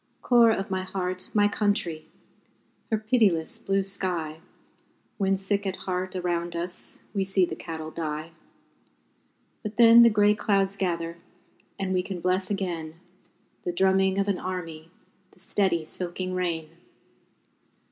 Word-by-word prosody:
Core 240 -2 +6
of 200 -2 -1
my 190 0 0
heart, 185 -1 -4
my 205 -1 +4
country! 200 -6 0 0.8
Her 220 - +2
pitiless 215 -7 +1
blue 195 0 0
sky, 175 -5 -3 0.8
When 195 -1 +2
sick 200 +1 0
at 190 - -2
heart, 185 0 -2
around 175 -1 -2
us, 175 +1 -5 0.2
We 195 -2 +1
see 190 -1 +2
the - - -6
cattle 160 -1 -6
die 155 0 -4 1.3
But 215 -1 -6
then 235 0 +9
the 235 - +8
grey 210 -1 +4
clouds 200 -2 +1
gather, 170 -3 -2 0.6
And 190 -1 -2
we 185 - +2
can 185 -1 -5
bless 185 +2 0
again 175 -6 -3 0.7
The 175 - -1
drumming 190 +1 +3
of 200 0 +1
an 195 -3 0
army, 165 -3 -5 0.4
The - - -22
steady, 185 -3 +1
soaking 185 +2 -4
rain. 165 -3 -2
185 Hz, 135 wpm, -26 LUFS, 170-200 Hz, 1.3 s, then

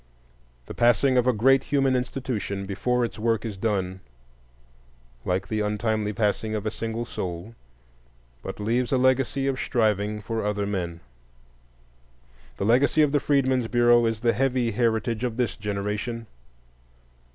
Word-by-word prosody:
The - - -8
passing 120 +3 +3
of 125 0 +3
a - - +6
great 135 +4 +3
human 135 -2 +2
institution 125 -6 -3
before 120 +5 0
its 115 - -8
work 115 0 0
is 110 -3 -4
done, 95 -3 -2 1.3
like 95 +2 -1
the 110 +1 -2
untimely 105 0 -1
passing 110 0 -1
of 105 0 -4
a 110 - -1
single 115 +1 -4
soul, 90 -1 -5 0.9
but - - -7
leaves 120 +4 0
a 135 - +3
legacy 130 +1 +2
of 135 -1 -1
striving 105 -3 0
for 110 +2 -3
other 105 0 -1
men. 85 -4 -3 1.6
The - - -2
legacy 135 +7 +4
of 145 - +2
the 145 - +3
Freedmen's 130 -4 +1
Bureau 120 0 +4
is 110 -1 -2
the 120 -1 +3
heavy 125 -1 +1
heritage 115 +1 0
of 120 -2 -2
this 125 -2 0
generation. 105 +3 -3
115 Hz, 145 wpm, -25 LUFS, 105-125 Hz, 1.6 s, a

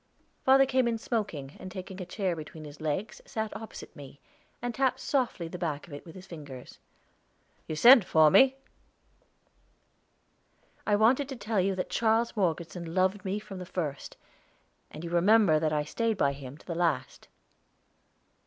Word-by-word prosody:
Father 270 +1 +6
came 260 -2 +2
in 230 -1 0
smoking, 200 - -3
and 185 - -8
taking 190 0 -7
a 180 - -6
chair 185 -2 -1
between 155 0 -9
his 145 0 -11
legs, 155 +8 -3
sat 220 -1 -4
opposite 225 - -9
me, 140 0 -12 0.4
and 245 0 -3
tapped 260 +1 +1
softly 250 - -1
the 180 +2 -7
back 155 -5 -3
of 170 - -13
it 145 - -8
with 165 - -11
his 185 0 -11
fingers. 145 -8 -10 0.9
"You 155 - -3
sent 240 - +8
for 155 -3 +5
me?" 265 - +6 2.3
"I 205 - +4
wanted 255 +6 +3
to 270 - -5
tell 220 -4 -1
you 195 +1 0
that 185 - -4
Charles 230 +1 +1
Morgeson 170 -3 -2
loved 190 +2 +1
me 195 +1 -2
from 210 -3 -8
the - - -5
first, 155 -6 -5 0.7
and 155 - -9
you 170 - -5
remember 180 -2 +5
that 155 0 0
I 150 -1 +1
stayed 225 +7 -1
by 140 -5 +2
him 140 0 -9
to - - -20
the 170 - -4
last." 165 -7 -1
185 Hz, 170 wpm, -29 LUFS, 155-225 Hz, 2.3 s, sent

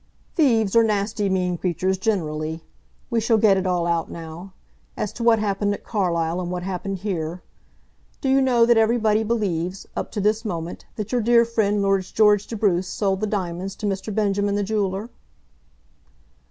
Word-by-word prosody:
"Thieves 230 - +2
are 230 - +7
nasty, 205 -1 0
mean 180 -2 0
creatures 185 +1 -1
generally. 160 -6 -2 0.5
We 235 - +2
shall 225 0 +3
get 210 -2 +5
it 190 0 -1
all 175 -2 +1
out 170 -1 0
now, 170 +3 -9 0.4
as 210 - -3
to 235 - -5
what 230 -1 +5
happened 205 -1 0
at - - -13
Carlisle 175 -4 -1
and 175 - -4
what 180 0 -3
happened 190 +1 -3
here. 175 -3 -4 0.8
Do - - -3
you 270 +1 +4
know 245 -3 +4
that 235 -1 +4
everybody 220 -1 +3
believes, 195 -5 -2
up - - -4
to 215 - -2
this 215 +3 +1
moment, 170 -5 -5
that 210 -2 -5
your 245 -1 +1
dear 235 +1 +5
friend 210 -3 +1
Lord 195 -1 +2
George 210 +1 +3
de 230 - -5
Bruce 190 -4 +1
sold 195 0 -1
the 215 - 0
diamonds 190 -1 -3
to - - -6
Mr. 195 +1 -2
Benjamin, 205 -1 0
the 205 - 0
jeweller?" 205 +1 -2
200 Hz, 180 wpm, -23 LUFS, 180-220 Hz, 0.8 s, are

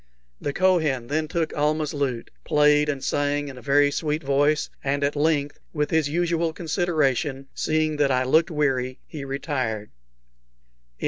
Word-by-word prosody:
The 145 - -1
Kohen 155 -9 +1
then 155 +1 0
took 160 0 -2
Almah's 150 0 0
lute, 135 -5 -2
played 150 0 +3
and 140 -2 -3
sang 145 0 0
in 130 - -10
a - - -13
very 145 +3 +3
sweet 155 +1 -2
voice, 145 +2 +2 0.2
and 140 +1 0
at 140 +1 0
length, 145 -1 0
with 150 -1 -1
his 160 -3 +2
usual 170 0 0
consideration, 150 - -1
seeing 155 -1 0
that 145 -1 +3
I 130 -1 +2
looked 160 +6 +3
weary, 135 -5 0
he 150 -4 -8
retired. 130 -6 -3
145 Hz, 150 wpm, -24 LUFS, 140-155 Hz, 0.2 s, played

